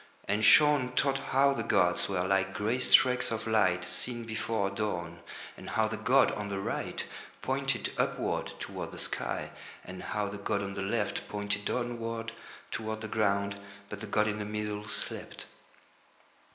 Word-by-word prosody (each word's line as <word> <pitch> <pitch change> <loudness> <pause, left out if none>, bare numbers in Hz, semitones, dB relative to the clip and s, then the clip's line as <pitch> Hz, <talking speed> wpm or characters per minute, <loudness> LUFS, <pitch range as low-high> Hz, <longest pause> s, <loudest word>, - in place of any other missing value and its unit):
And 105 +2 +1
Shaun 145 -2 +6
taught 135 0 +2
how 140 +1 +3
the - - -2
gods 90 +2 +2
were 90 -2 0
like 95 0 +1
grey 110 +5 0
streaks 125 0 +5
of 115 -1 -3
light 95 -5 +3
seen 120 +3 -1
before 110 -3 -1
dawn, 90 -5 -3 0.4
and - - -9
how 110 0 +2
the 110 - -3
god 130 +4 +4
on 105 -1 -4
the 100 - -2
right 95 - -3 0.4
pointed - - -1
upward - - 0
toward - - -5
the - - -8
sky, - - -3 0.3
and 90 0 -7
how 105 -1 -2
the 100 0 -6
god 100 0 -1
on 100 0 -4
the 95 - -4
left 105 +2 -1
pointed 105 0 -2
downward 115 -1 -2 0.4
toward 110 0 -3
the 110 - -4
ground, 100 -2 0 0.3
but 105 -1 -7
the 110 - -5
god 105 +1 +2
in 105 0 -1
the - - -2
middle 105 0 -3
slept. 100 - -4
105 Hz, 165 wpm, -30 LUFS, 100-115 Hz, 0.4 s, Shaun